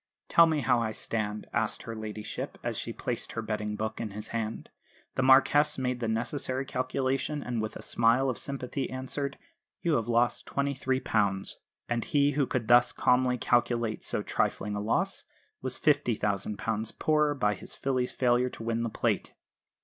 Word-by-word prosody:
"Tell 170 0 +7
me 155 -2 +1
how 120 - +3
I 110 -2 -1
stand," 105 -1 -2
asked - - 0
her 115 - -6
ladyship, 110 -1 -5
as - - -2
she - - -3
placed - - -4
her 115 - -2
betting 105 -1 -2
book 110 +1 -3
in 110 - -3
his 105 +2 -7
hand. 110 -1 -4 0.4
The - - 0
Marquess 140 +3 +5
made 125 -1 -1
the 115 - -1
necessary 130 +4 -1
calculation; 135 +2 -1
and 120 -2 -2
with 110 - -4
a - - -7
smile 120 +3 +3
of 130 - -1
sympathy, 135 -1 -4
answered: 135 +2 -3 0.5
"You 165 -3 +3
have 115 - -2
lost 120 +1 +1
£23." 130 -8 0 0.3
And 120 -1 0
he, 145 0 +3
who 140 -2 +1
could 120 -4 -2
thus 120 0 +6
calmly 125 0 +2
calculate 120 -2 +1
so - - -2
trifling 105 - -1
a 105 - -2
loss, 110 +2 0 0.4
was 130 0 -2
£50,000 110 -5 0
poorer 150 -1 +2
by 105 -6 +2
his 95 - -5
filly's 130 -2 0
failure 125 0 +2
to 115 - -9
win 115 0 -1
the 115 - -1
Plate! - - -1
120 Hz, 170 wpm, -29 LUFS, 110-135 Hz, 0.5 s, Tell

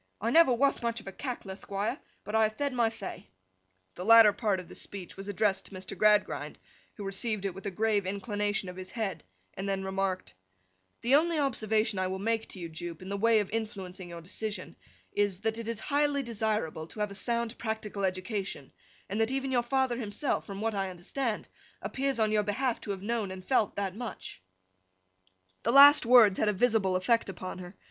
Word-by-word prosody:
I 225 +3 0
never 325 -2 +6
wath 275 +3 +2
much 235 0 -1
of - - -14
a 195 - -6
Cackler, 240 -4 -5
Thquire, 200 +1 -3 0.3
and 210 - -3
I 220 - +5
have 215 0 +2
thed 285 +1 -1
my 235 -2 +2
thay.' 225 -3 -8 0.7
The 180 - -7
latter 225 0 +8
part 205 -2 0
of 180 - -9
this - - -5
speech 195 -3 -7
was 195 +1 -8
addressed 205 0 0
to 195 - -11
Mr. 185 0 -7
Gradgrind, 210 -1 +2 0.4
who 205 - -7
received 200 +1 -1
it 195 - -1
with 195 +3 -7
a - - +1
grave 205 0 0
inclination 205 0 -1
of 180 0 -8
his 185 0 -7
head, 195 -9 -3 0.3
and 195 +1 -4
then 195 -1 -1
remarked: 190 -1 -2 0.7
'The 240 +3 +1
only 325 +3 +4
observation 220 -7 +1
I 185 - +1
will 190 +1 -3
make 225 +3 -1
to - - -10
you, 175 -2 -5
Jupe, 165 +1 -7
in 185 - -8
the 200 - -2
way 220 +1 +4
of 205 - -6
influencing 195 -5 -5
your 170 -1 -8
decision, 205 +5 -5 0.4
is, 205 -2 0
that 225 +1 -1
it 230 - -6
is 230 -2 -3
highly 285 0 +1
desirable 215 -9 -2
to 215 - -11
have 210 -1 -1
a - - -6
sound 235 +2 -1
practical 220 -3 -3
education, 185 - -3 0.4
and 205 +3 -1
that 225 - +2
even 270 0 -2
your 245 -2 +3
father 260 0 0
himself 235 +4 -2
(from 200 -1 -6
what 225 0 0
I 195 -1 -1
understand) 210 +6 -3 0.3
appears, 270 -1 -2
on 215 -1 +2
your 215 -1 +3
behalf, 230 +4 -1
to - - -9
have 195 -1 -3
known 225 -2 -1
and 185 0 -8
felt 230 -6 +2
that 195 -2 -2
much.' 235 - -7 1.2
The 235 - +1
last 280 -1 +9
words 235 -6 +7
had 215 - +3
a - - +1
visible 205 -3 +2
effect 230 +4 +2
upon 185 -1 -6
her. 180 +1 -9
210 Hz, 205 wpm, -30 LUFS, 195-230 Hz, 1.2 s, last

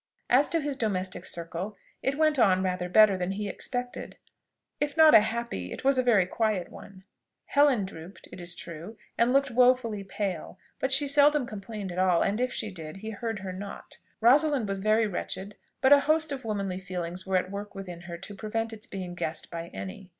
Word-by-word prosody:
As 265 +4 +5
to 330 - +1
his 285 -2 -3
domestic 190 -6 -2
circle, 170 +4 -5 0.2
it 275 +1 -1
went 310 -2 +3
on 190 -4 +4
rather 180 -1 -2
better 200 0 +6
than 180 +1 -1
he 205 +1 -3
expected: 245 +4 -5 0.6
if 295 +2 -2
not 315 -1 +8
a - - +11
happy, 220 - -3
it - - -7
was 270 -1 +3
a - - +5
very 225 -7 +4
quiet 205 -2 -1
one. 190 -1 -12 0.4
Helen 280 -8 +3
drooped, 180 0 -11
it 180 - -9
is 175 0 -5
true, 170 +8 -9 0.2
and 235 +1 +3
looked 275 0 +2
wofully 245 -4 +3
pale; 190 -3 -4 0.2
but 265 - -1
she 280 +2 +4
seldom 290 0 +4
complained 210 -3 -6
at 175 - -4
all, 185 -2 +3
and 210 +4 0
if 250 0 0
she 215 -2 -3
did, 160 -2 -8
he 220 +3 -6
heard 225 +1 -4
her 190 -1 -5
not. 200 +2 -8 0.2
Rosalind 275 0 +4
was 195 0 -2
very 215 +3 +3
wretched; 200 0 -4 0.3
but 265 +2 +7
a 285 - +8
host 310 +2 +1
of 270 -2 -4
womanly 200 -4 -2
feelings 180 0 -5
were 190 -1 +2
at 185 +1 -2
work 200 0 -6
within 180 -3 -7
her 175 -1 -7
to 205 - -8
prevent 225 +3 -3
its 220 0 -10
being 185 -2 -6
guessed 160 -2 -3
by 170 0 -5
any. 190 +1 -8
205 Hz, 200 wpm, -28 LUFS, 185-250 Hz, 0.6 s, a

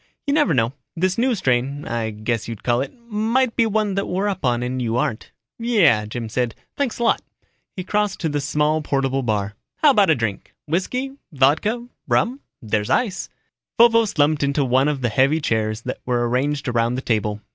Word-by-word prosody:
You 280 - +1
never 295 -1 +3
know, 115 +1 +1 0.2
this 185 +4 0
new 250 0 +2
strain 135 - 0
I 115 -1 -2
guess 110 0 -3
you'd 115 -3 -7
call 120 0 +2
it 135 - -4 0.2
might 230 +3 +1
be 230 -2 +3
one 215 -2 0
that 200 +1 -1
we're 190 +3 -1
up 190 -4 -3
on 120 -2 +1
and 125 +1 -2
you 115 -1 -1
aren't." 115 -2 -2 0.3
"Yeah," 200 - +3
Jim 115 +1 -5
said. 120 +1 -1 0.2
"Thanks 280 -5 -1
a 235 - -2
lot." 230 - +2 0.5
He 185 - -4
crossed 205 +1 -1
to 165 - 0
the 145 -1 -1
small 150 +2 +1
portable 135 -2 0
bar. 105 -4 -1 0.2
"How 300 - +5
about 205 -8 +4
a 160 - +5
drink? 115 -5 -4
Whisky, 250 - -1 0.2
vodka, 160 - +2 0.2
rum 255 +4 +1 0.2
there's 105 -1 -1
ice." 200 -7 0 0.5
Vovo 230 -1 +6
slumped 150 -5 +1
into 140 0 +1
one 130 +2 +3
of 145 -3 -1
the 120 - +1
heavy 135 +8 +3
chairs 110 -5 -1
that - - -5
were 120 -1 0
arranged 140 +4 -1
around 120 0 +1
the 130 - -3
table. 105 -2 0
140 Hz, 195 wpm, -21 LUFS, -, 0.5 s, Vovo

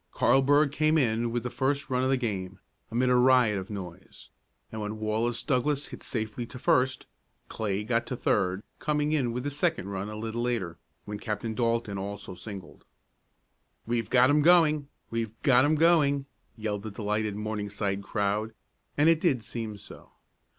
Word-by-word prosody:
Carlburg 140 +2 +4
came 155 +2 +2
in 120 -4 +1
with 120 -1 -2
the 125 - -4
first 140 +1 -1
run 125 0 +1
of 130 - +1
the 135 - +3
game, 100 -6 -3 0.3
amid 125 +2 +1
a - - +5
riot 125 -5 +4
of 95 - -8
noise, 95 -3 -9 0.4
and 110 - -5
when 105 +1 -4
Wallace 110 +2 -1
Douglass 140 +1 0
hit - - -9
safely 115 +1 -3
to 130 - -10
first, 130 0 +1 0.4
Clay 105 -2 -2
got 115 +1 0
to 125 - -3
third, 95 -4 0 0.2
coming 150 0 0
in 135 -6 +1
with 125 +1 -3
the 145 - -2
second 145 - -1
run 100 +1 -4
a 105 - -6
little 115 +2 -3
later, 115 -9 -2 0.3
when 105 0 -6
Captain 110 +1 -3
Dalton 115 -4 -1
also 100 0 -5
singled. 95 -3 -9 1.0
"We've 115 -1 -1
got 130 +2 +5
'em 150 +1 +4
going! 155 -3 +5 0.2
We've 115 -1 -3
got 130 -2 +5
'em 155 +2 +3
going!" 150 -4 +3 0.3
yelled 105 -2 -3
the 110 - -6
delighted 105 0 -2
Morningside 105 -2 -3
crowd, 105 +2 -2 0.4
and 150 +2 +4
it 165 -1 +4
did 130 -10 +2
seem 110 -1 -4
so. 100 - -14
115 Hz, 170 wpm, -28 LUFS, 105-135 Hz, 1.0 s, a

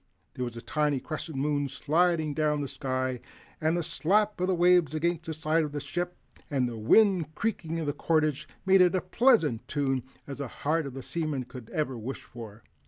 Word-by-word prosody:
There 125 - -3
was 120 -1 -6
a 115 - -8
tiny 150 -3 0
crescent 155 +1 -6
moon 145 0 0
sliding 160 +1 +1
down 150 -1 +1
the 140 - -2
sky, 130 -1 -2 0.4
and 160 +2 +2
the 175 - -1
slap 200 +5 +1
of 185 - +1
waves 175 -3 +4
against 170 +1 -1
the 160 - -3
side 155 +1 +1
of 150 -1 -4
the 145 - -2
ship 175 +4 -4 0.3
and 130 -4 +1
the 120 - -5
wind 160 - +3
creaking 165 -7 -2
in 165 - -2
the 145 - -1
cordage 155 -1 0 0.2
made 190 0 +6
as 180 +1 +4
pleasant 225 - +4
a - - -34
tune 135 -3 0 0.2
as 140 -1 -7
the 140 - -3
heart 155 +5 -1
of 135 - -8
a 135 - -6
seaman 155 -5 -2
could 125 -2 -11 0.2
wish 120 +3 -6
for. 110 -3 -11
155 Hz, 195 wpm, -28 LUFS, 135-170 Hz, 0.4 s, made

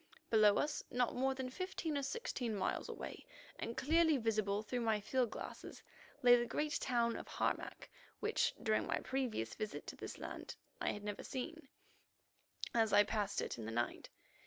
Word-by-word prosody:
Below 215 -2 +7
us, 295 0 0
not 245 -1 +1
more 265 +1 +2
than 260 -1 -3
fifteen 365 -1 -2
or 285 - +1
sixteen 275 - -2
miles 190 - -1
away, - - -6 0.4
and 230 - -4
clearly 320 +1 +4
visible 215 -3 +1
through 245 +3 -2
my 220 -2 +2
field 245 +3 +1
glasses, - - -7 0.4
lay 245 0 +9
the 240 0 +1
great 300 +4 0
town 235 -2 +2
of - - -6
Harmac, - - -2 0.3
which, 440 +1 +1
during 220 -1 +2
my - - +1
previous 250 - -1
visit 215 -1 -4
to - - -6
this - - -6
land, - - -6 0.3
I - - +2
had 205 - -6
never 205 -1 -3
seen, 320 +4 -5 1.1
as 225 -2 +3
I 205 0 +8
passed 205 -1 0
it - - -4
in 110 - -5
the 110 - -4
night. 120 +1 -1
240 Hz, 175 wpm, -37 LUFS, 210-270 Hz, 1.1 s, lay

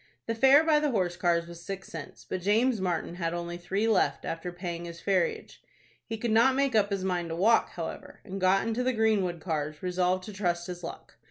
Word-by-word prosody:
The 230 - -1
fare 265 +6 +6
by 315 -2 +4
the 300 0 +1
horse 185 -8 0
cars 170 -1 +1
was 170 0 -11
six 195 0 -6
cents, 155 -3 -9
but 185 - -3
James 220 +4 +2
Martin 175 -1 -2
had 165 -1 -2
only 175 0 -4
three 195 +5 -1
left 220 -4 +2
after 165 +2 -4
paying 175 -1 -5
his 170 0 -8
ferriage. 185 -3 -1 0.5
He 225 - -4
could 230 +1 -2
not 235 +4 +5
make 275 -1 +1
up 210 -2 +3
his 195 -2 -2
mind 175 -3 -1
to 165 - -3
walk, 220 +7 +4
however, - - -7
and 195 0 -6
got 190 +3 +3
into 230 +2 -1
the 255 +1 +1
Greenwood 210 -6 +1
cars, 155 -2 -3
resolved 180 0 +1
to 210 - -8
trust 175 -3 -1
his 180 -1 -7
luck. - - -9
185 Hz, 220 wpm, -28 LUFS, 175-220 Hz, 0.5 s, fare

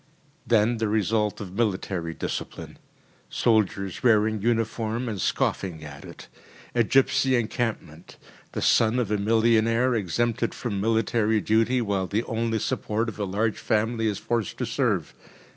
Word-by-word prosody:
Then 115 +1 +3
the 110 0 0
result 105 0 0
of 95 -3 -7
military 95 -6 -2
discipline: - - -6 0.5
soldiers 100 -5 0
wearing 110 -3 +3
uniform 115 +1 -1
and 105 -5 -3
scoffing 85 -5 -1
at 70 -2 -10
it. - - -11 0.5
A 120 - +3
gipsy 135 +2 +3
encampment. 110 -8 -3 0.4
The - - -3
son 115 +2 +3
of 115 -5 -1
a 105 - +1
millionaire 115 +3 +3
exempted 115 +3 -1
from 105 -6 -3
military 110 0 +1
duty, 115 +4 +2
while 100 -3 -1
the 105 +5 -1
only 115 -1 -1
support 110 +1 -1
of 110 - -10
a 100 - 0
large 105 +3 -1
family 110 +1 0
is 105 -2 -1
forced 115 -5 -2
to - - -2
serve. - - -1
110 Hz, 145 wpm, -25 LUFS, 100-115 Hz, 0.5 s, Then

